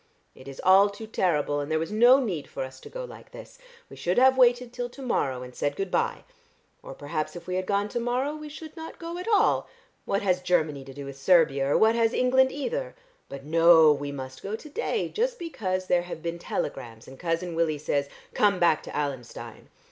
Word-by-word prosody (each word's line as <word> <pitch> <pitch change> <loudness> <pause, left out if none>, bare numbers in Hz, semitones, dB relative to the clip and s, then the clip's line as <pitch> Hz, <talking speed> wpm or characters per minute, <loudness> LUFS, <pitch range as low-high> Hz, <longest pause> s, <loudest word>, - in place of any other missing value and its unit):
It 130 - -15
is 135 -1 -9
all 195 +2 +6
too 200 +2 -9
terrible, 150 -9 0
and 145 +2 -4
there 155 - +2
was 165 +4 -3
no 240 +5 +6
need 185 - -3
for - - -5
us 130 0 -9
to - - -12
go - - -6
like - - -13
this. - - -12 0.3
We - - -12
should 175 +1 -1
have 260 +1 +6
waited 245 -1 +3
till 245 0 -4
to 275 - -12
morrow, 130 - -1
and 125 0 -10
said 145 +3 -2
good 195 +1 -4
bye. - - 0 0.6
Or - - -10
perhaps 150 +3 -4
if 170 -1 -9
we 180 - -4
had 185 0 -2
gone 200 0 +1
to 240 - -2
morrow 250 +5 -1
we 305 0 -8
should 310 +1 -10
not 320 -1 -9
go 335 +1 -6
at 365 - -7
all. 430 -1 +2 0.4
What 195 - -1
has 185 -2 +1
Chermany 155 -6 0
to 135 - -9
do 140 -1 -7
with 135 0 -9
Servia, 140 -4 +3
or - - +4
what 220 +1 +5
has 230 0 +2
England 260 +1 +3
either? - - -4 0.3
But 140 0 -8
no, 165 0 +6
we 145 0 -5
must 130 -1 -8
go 200 +2 -4
to 300 +7 -11
day 455 +6 -2
just 485 +2 -1
because 190 - -3
there 180 -1 +2
have 175 -2 -8
been 170 0 -4
telegrams, 120 -9 -5
and 130 0 -13
Cousin 170 0 -2
Willie 165 -2 0
says, 140 -1 -1 0.2
'Come 205 -2 +3
back 170 -3 +3
to - - -7
Allenstein.' 140 -5 -5
180 Hz, 225 wpm, -26 LUFS, -, 0.6 s, all